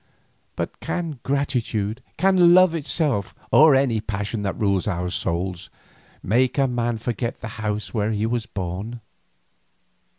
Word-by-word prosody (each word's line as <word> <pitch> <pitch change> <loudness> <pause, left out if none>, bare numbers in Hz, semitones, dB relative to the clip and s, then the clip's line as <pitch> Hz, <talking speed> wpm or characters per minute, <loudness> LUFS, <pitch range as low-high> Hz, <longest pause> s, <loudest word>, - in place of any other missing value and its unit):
But - - -4
can 165 -6 -4
gratitude, 125 -5 -1 0.2
can 180 -1 +5
love 185 -2 +6
itself, 145 - 0 0.2
or 155 -2 +7
any 130 -5 +2
passion 105 +1 -3
that 100 -2 -3
rules 100 -2 +1
our 90 -2 -2
souls, 90 +1 -3 0.5
make 125 +7 +2
a 135 -1 +3
man 120 -2 -1
forget 120 +1 -3
the 110 - -6
house 105 -1 -3
where 105 -2 0
he 105 0 0
was 115 0 -1
born? 100 +5 -5
115 Hz, 135 wpm, -23 LUFS, 100-135 Hz, 0.5 s, or